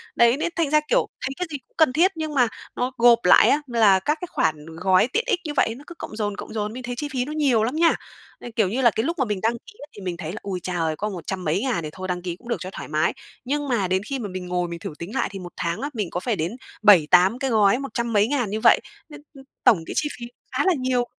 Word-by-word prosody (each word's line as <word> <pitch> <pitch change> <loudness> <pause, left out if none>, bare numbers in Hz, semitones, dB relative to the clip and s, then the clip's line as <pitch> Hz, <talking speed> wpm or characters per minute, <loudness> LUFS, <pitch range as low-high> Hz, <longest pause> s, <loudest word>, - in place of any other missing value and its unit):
đấy, 235 +3 +5
nên 340 - -1
thành 330 -4 +1
ra, 305 - +5
kiểu, - - +2
thấy 260 - -2
cái 360 - -2
gì 290 - -3
cũng - - -40
cần 315 -6 +4
thiết 355 +6 +4
nhưng 315 -2 -4
mà 250 -3 +4 0.3
nó 250 +1 -1
gộp 235 0 +6
lại 180 - +7
á, 295 - +3
là 215 -5 +4
các 300 +11 0
cái 360 - -4
khoản 155 -2 0
gói 185 +3 +4
tiện 455 +3 +2
ích 360 - +1
như 295 - -3
vậy 225 - +1
nó 285 - -13
cứ 345 - -10
cộng - - -7
dồn, 205 -2 -2
cộng - - -8
dồn, 210 0 -3
mình 255 0 -7
thấy 245 0 -4
chi 295 - -3
phí 250 -1 0
nó 295 - -6
nhiều 270 -8 +2
lắm 245 +6 -1
nha. 330 +1 +4 0.4
À, 240 - -8
kiểu 210 -5 +2
như 255 +6 -1
là, 235 -3 +5
cái 220 - -1
lúc 335 +1 -2
mà 265 - +2
mình 210 -4 -2
đăng 225 +2 +2
ký 235 - -12
á, 290 - -10
thì 205 - -10
mình 180 -2 -4
thấy 165 -2 -5
là 215 - -6
"Ôi 190 -2 -4
cha 180 -1 -3
ơi! 160 -1 0
Có 210 +1 -2
một 180 -4 -8
trăm 190 -2 -3
mấy 165 +4 0
ngàn 230 -11 -1
thì 155 - -4
thôi 185 0 -6
đăng 180 -1 -2
ký 175 -1 -4
cũng 235 - -17
được - - 0
cho 185 - -6
thoải - - -8
mái" 155 +1 +1 0.3
nhưng 290 +2 -1
mà 215 -7 +1
đến 185 +1 +1
khi 270 +4 -4
mà 210 - -5
mình 185 -1 -6
ngồi 180 -1 -1
mình 170 0 -6
thử 165 - -6
tính 175 +6 -7
lại - - 0
thì 195 - -7
một 175 -1 -9
tháng 170 +6 -2
á, 285 - -2
mình 210 -7 -3
có 180 - -3
phải 225 +3 -1
đến 170 +1 -2 0.3
7-8 185 +3 +6
cái 270 - -1
gói 210 +1 +4
một 275 0 -6
trăm 235 -1 -2
mấy 205 +1 +4
ngàn 250 -6 0
như 215 +2 -2
vậy, - - +7 0.3
nên, 295 0 -11
ừm, 270 - -13 0.2
tổng 215 - +6
cái - - -6
chi 300 - +1
phí 235 - -6 0.3
khá - - 0
là 375 - +4
nhiều 255 -1 +1
225 Hz, 310 wpm, -23 LUFS, 185-270 Hz, 0.4 s, lại